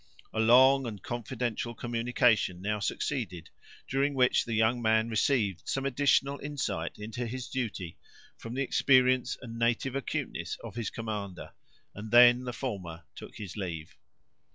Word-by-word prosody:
A - - -2
long 130 +4 +6
and 105 -3 -6
confidential 120 0 -3
communication 115 -5 +1
now 105 +2 -2
succeeded, 100 - -3 0.4
during 140 +1 0
which 125 -1 +3
the 115 - -2
young 110 +2 +2
man 110 0 +2
received 110 -5 +1
some 135 0 -1
additional 140 +1 +2
insight 135 - -3
into 115 +3 -5
his 125 +2 -5
duty, 110 -9 -4 0.4
from 115 +1 -8
the 135 - 0
experience 130 -1 +3
and 115 -1 -7
native 120 +3 0
acuteness 135 - -3
of - - -7
his 115 -2 -3
commander, 105 -5 -6 0.4
and 105 +2 -8
then 120 +2 +7
the 125 - -3
former 95 -10 -5
took - - -11
his 105 -5 -8
leave. 85 -6 -5
120 Hz, 145 wpm, -29 LUFS, 105-130 Hz, 0.4 s, then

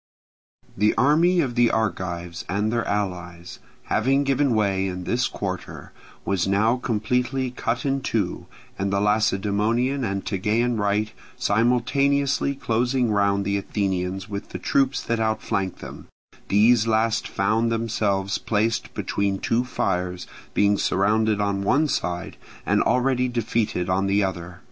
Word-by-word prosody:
The 105 +2 +2
army 170 +6 +4
of 130 -5 -2
the 120 -1 +4
Argives 90 -5 -2
and 105 +3 0
their 115 -1 -1
allies, 90 -3 -4 0.2
having 135 +5 +1
given 135 -2 +1
way 100 -3 +1
in 90 -1 -5
this 120 +7 0
quarter, 95 -2 -6 0.3
was 95 -2 0
now 110 +5 +2
completely 125 +3 -1
cut 120 0 -2
in 135 0 0
two, 110 -9 -2 0.3
and 100 0 -1
the 100 - +1
Lacedaemonian 105 +5 +1
and 100 -3 -2
Tegean 110 +5 0
right 105 +1 0 0.3
simultaneously 135 +6 +1
closing 125 -1 0
round 100 -1 +1
the 100 0 0
Athenians 95 -1 -2
with 100 -1 -6
the - - -5
troops 135 -1 +1
that 115 -1 -1
outflanked 110 -3 -1
them, - - -9 0.4
these 110 +3 +4
last 110 0 +1
found 110 +3 0
themselves 105 -3 -1
placed 110 +1 -1
between 100 -1 -1
two 115 +5 0
fires, 90 -7 -2 0.3
being 100 0 +3
surrounded 105 +2 +1
on 100 -1 0
one 145 +10 +2
side 90 -8 -3 0.3
and - - +2
already 125 +1 +2
defeated 115 -6 -1
on 95 +2 +1
the 100 +1 +2
other. 90 -2 -4
110 Hz, 135 wpm, -24 LUFS, 100-120 Hz, 0.4 s, army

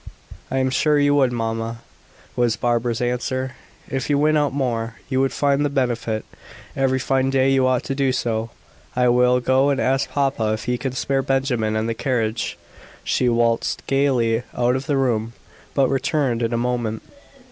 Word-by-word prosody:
"I 135 - -2
am 130 0 +1
sure 150 +3 +2
you 145 0 +3
would, 135 -3 +3
mamma," 115 0 -3 0.5
was 120 -2 +2
Barbara's 120 -1 0
answer. 130 +2 -2 0.3
"If 135 +1 -3
you 145 - +3
went 155 +2 +3
out 145 -1 +2
more, 115 -4 -2
you 130 -1 +1
would 135 - +1
find 140 0 +1
the 145 - +1
benefit. 120 -5 -1 0.5
Every 135 -1 +1
fine 135 0 +1
day 135 0 +3
you 135 -1 +3
ought 130 -1 +1
to - - -3
do 135 -1 +1
so. 115 -3 -1 0.5
I 125 0 +3
will 125 +1 +4
go 130 +3 +2
and 140 -1 +1
ask 135 +1 +1
papa 135 -6 0
if 110 - -4
he 125 0 -1
can 135 -2 -3
spare 135 +1 0
Benjamin 130 -5 0
and 110 +1 0
the 115 - -1
carriage." 115 -2 -2 0.5
She 125 - +1
waltzed 115 -1 0
gaily 125 -5 +2 0.2
out 125 +1 +2
of 135 +2 -4
the 145 -3 +1
room, 115 -4 0 0.4
but 135 -2 +4
returned 135 -3 0
in 115 0 0
a 120 - 0
moment. 120 -2 -2
125 Hz, 180 wpm, -22 LUFS, 115-135 Hz, 0.5 s, will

